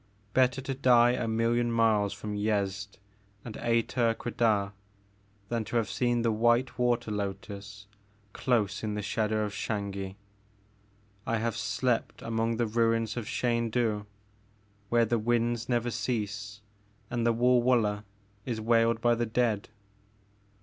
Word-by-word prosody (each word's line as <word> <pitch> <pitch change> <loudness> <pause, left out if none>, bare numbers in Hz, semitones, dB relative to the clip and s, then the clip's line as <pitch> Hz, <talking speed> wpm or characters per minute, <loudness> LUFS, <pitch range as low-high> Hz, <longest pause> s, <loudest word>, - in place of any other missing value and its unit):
Bet 130 -1 +4
ter 135 - -6
to 135 - -2
die 120 -2 +5
a 120 -1 -1
million 115 +1 +1
miles 110 -3 +3
from 105 -1 -6
Yezd 100 -1 -1 0.5
and 115 -3 -7
Ater 115 0 +1
Quedah 110 -5 0 0.8
than 115 -1 -1
to 115 - -6
have 110 -4 +1
seen 120 +1 +1
the 115 - +2
white 120 +3 +2
water 120 -3 +1
lotus 100 0 -5 0.5
dose 110 -6 0
in 105 -1 -2
the 105 - -3
shadow 110 +1 0
of 105 - -4
Xangi! 100 -3 -3 1.1
I 115 - +1
have 115 0 -1
slept 125 -3 -1
among 115 0 -1
the 120 - +1
ruins 115 0 +1
of 120 -3 -4
Xaindu 115 -3 0 0.8
where 120 0 +4
the 115 +1 0
winds 120 +1 0
never 120 -1 +1
cease 100 -4 -3 0.5
and 120 -1 -1
the 115 - +4
WulwuUeh 120 -3 +3 0.4
is 120 -3 -3
wailed 115 0 +2
by 120 0 +4
the 120 0 -1
dead." 110 -2 0
115 Hz, 135 wpm, -29 LUFS, 105-120 Hz, 1.1 s, die